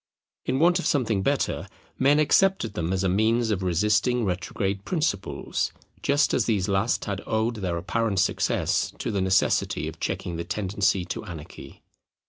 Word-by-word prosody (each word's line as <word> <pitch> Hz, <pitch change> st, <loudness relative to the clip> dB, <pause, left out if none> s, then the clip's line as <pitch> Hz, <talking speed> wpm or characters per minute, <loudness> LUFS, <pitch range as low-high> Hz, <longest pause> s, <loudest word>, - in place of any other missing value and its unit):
In 130 Hz, -, 0 dB
want 175 Hz, +4 st, +4 dB
of -, -, -1 dB
something 115 Hz, -, +1 dB
better, -, -, 0 dB, 0.3 s
men 140 Hz, +3 st, +4 dB
accepted 155 Hz, -, +3 dB
them 85 Hz, -3 st, -2 dB
as 95 Hz, 0 st, 0 dB
a -, -, +2 dB
means 110 Hz, +4 st, +2 dB
of 100 Hz, -3 st, -1 dB
resisting 105 Hz, +7 st, +2 dB
retrograde 95 Hz, +1 st, -2 dB
principles, 100 Hz, -, -1 dB, 0.3 s
just 145 Hz, +1 st, +2 dB
as 120 Hz, -, +2 dB
these 100 Hz, -5 st, +1 dB
last 100 Hz, +3 st, 0 dB
had 100 Hz, -1 st, -3 dB
owed 110 Hz, +1 st, 0 dB
their 90 Hz, -4 st, -2 dB
apparent 100 Hz, +3 st, -1 dB
success 95 Hz, -, +1 dB
to -, -, -3 dB
the 100 Hz, -2 st, 0 dB
necessity 95 Hz, -4 st, +1 dB
of 80 Hz, 0 st, -8 dB
checking 85 Hz, -2 st, -3 dB
the 85 Hz, -, -3 dB
tendency 95 Hz, 0 st, 0 dB
to -, -, -5 dB
anarchy. 80 Hz, -2 st, -10 dB
100 Hz, 160 wpm, -25 LUFS, 95-115 Hz, 0.3 s, want